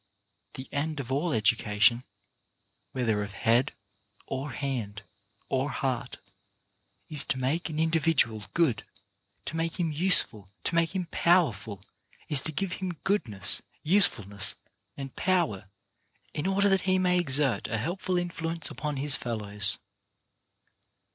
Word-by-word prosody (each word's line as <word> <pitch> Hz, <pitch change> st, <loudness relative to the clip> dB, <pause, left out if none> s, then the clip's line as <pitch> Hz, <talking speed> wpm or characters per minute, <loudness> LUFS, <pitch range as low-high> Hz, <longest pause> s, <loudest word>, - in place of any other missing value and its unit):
The 130 Hz, -, -7 dB
end 150 Hz, +1 st, -2 dB
of 130 Hz, -2 st, -5 dB
all 150 Hz, +6 st, 0 dB
education, 110 Hz, 0 st, +3 dB, 0.9 s
whether 115 Hz, -5 st, 0 dB
of 100 Hz, -1 st, -5 dB
head 115 Hz, +5 st, +2 dB, 0.5 s
or 135 Hz, +2 st, -4 dB
hand 120 Hz, -6 st, -4 dB, 0.4 s
or 135 Hz, +2 st, 0 dB
heart, 130 Hz, -3 st, -3 dB, 0.9 s
is 150 Hz, -3 st, -1 dB
to -, -, -1 dB
make 140 Hz, +7 st, -1 dB
an 155 Hz, -, -5 dB
individual 160 Hz, -, +1 dB
good, 160 Hz, -9 st, +2 dB, 0.6 s
to -, -, -5 dB
make 165 Hz, +2 st, -2 dB
him 165 Hz, -3 st, 0 dB
useful, 145 Hz, -, +3 dB
to -, -, -2 dB
make 165 Hz, +2 st, +1 dB
him 185 Hz, -2 st, -1 dB
powerful; 110 Hz, -, +1 dB, 0.5 s
is 145 Hz, -3 st, +5 dB
to 160 Hz, -, -2 dB
give 180 Hz, +4 st, -2 dB
him 180 Hz, -3 st, -3 dB
goodness, 110 Hz, -, +1 dB, 0.2 s
usefulness 120 Hz, -, +2 dB, 0.4 s
and 135 Hz, -2 st, -7 dB
power 165 Hz, -, 0 dB, 0.6 s
in 150 Hz, +5 st, -2 dB
order 200 Hz, +1 st, +2 dB
that 195 Hz, -2 st, +3 dB
he 185 Hz, -, +4 dB
may 180 Hz, -1 st, +2 dB
exert 140 Hz, -5 st, +2 dB
a 110 Hz, -, -2 dB
helpful 180 Hz, -, -2 dB
influence 165 Hz, -2 st, -2 dB
upon 150 Hz, -2 st, -4 dB
his 140 Hz, +1 st, +3 dB
fellows. 105 Hz, -3 st, +2 dB
140 Hz, 130 wpm, -28 LUFS, 115-170 Hz, 0.9 s, is